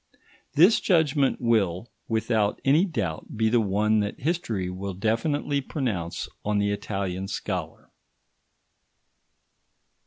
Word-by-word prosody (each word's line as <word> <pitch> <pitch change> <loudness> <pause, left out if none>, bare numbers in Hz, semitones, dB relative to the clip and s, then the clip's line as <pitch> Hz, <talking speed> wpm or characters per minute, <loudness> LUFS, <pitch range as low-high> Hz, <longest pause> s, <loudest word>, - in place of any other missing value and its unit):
This 180 +9 +6
judgment 150 -6 +2
will, 110 -3 +1 0.2
without 110 -2 0
any 150 +7 +5
doubt, 110 - -4
be 110 0 +2
the 120 0 +3
one 105 +2 +2
that 105 0 -2
history 120 - -1
will 95 +1 -5
definitely 140 - 0
pronounce 110 - -3 0.2
on 105 0 0
the 100 0 +1
Italian 95 -2 -3
scholar. - - -5
110 Hz, 105 wpm, -26 LUFS, 100-140 Hz, 0.2 s, This